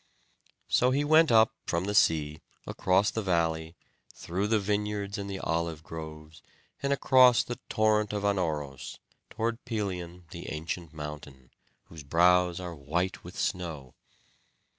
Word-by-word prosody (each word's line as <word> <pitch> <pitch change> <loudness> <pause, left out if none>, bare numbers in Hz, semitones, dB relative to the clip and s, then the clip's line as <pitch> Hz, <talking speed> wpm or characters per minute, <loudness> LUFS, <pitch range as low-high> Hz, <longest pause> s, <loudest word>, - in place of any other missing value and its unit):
So 125 - +3
he 140 +3 +1
went 155 0 +5
up 110 -1 +5
from 85 +1 0
the 100 - -2
sea 75 -6 +2 0.2
across 95 +2 +2
the 110 - -2
valley, 80 -3 0 0.4
through 95 +4 -2
the 110 +1 +3
vineyards 105 0 -2
and 100 0 -5
the 95 - -4
olive 85 -3 -2
groves, 80 0 -9 0.4
and 140 - -1
across 130 -3 +5
the 120 0 -6
torrent 110 -1 +2
of 105 -1 -3
Anauros, 80 -9 -2 0.3
toward 115 +1 -3
Pelion 90 -5 -4
the - - -7
ancient 80 +1 -5
mountain, 75 -4 -9 0.3
whose 80 -2 -12
brows 90 +4 +3
are 90 -2 -6
white 85 +5 -2
with 90 +2 -10
snow. 80 -8 -3
90 Hz, 140 wpm, -29 LUFS, 80-105 Hz, 0.4 s, went